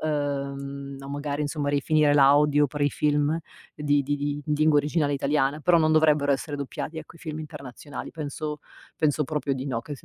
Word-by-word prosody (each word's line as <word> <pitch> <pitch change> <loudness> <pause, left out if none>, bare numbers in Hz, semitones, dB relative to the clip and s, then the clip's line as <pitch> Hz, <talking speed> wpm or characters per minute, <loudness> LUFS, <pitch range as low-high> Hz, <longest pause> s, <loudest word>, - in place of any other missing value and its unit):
uhm 140 -2 -3
o 135 - -8
magari, 145 +1 -3
insomma, 145 0 -2
rifinire 145 +1 +3
l'audio 145 +1 +5
per 145 +1 -4
i 145 - +4
film 150 +1 +1 0.4
di 145 -1 +1
di 145 +2 -1
di 145 +1 -3
lingua 150 0 +3
originale 145 0 +1
italiana, 140 +1 +1
però 175 +2 +4
non 155 0 +3
dovrebbero 150 -2 +4
essere 140 +2 -3
doppiati, 140 +3 -5
ecco, 160 +1 -11
i - - -18
film 155 -1 -6
internazionali. 140 -1 -8
Penso 150 -1 -5 0.4
penso 150 -1 +1
proprio 150 -1 -1
di 130 +1 -5
no, 125 -4 -2
che 145 +5 -7
se - - -18
145 Hz, 185 wpm, -26 LUFS, 140-150 Hz, 0.4 s, l'audio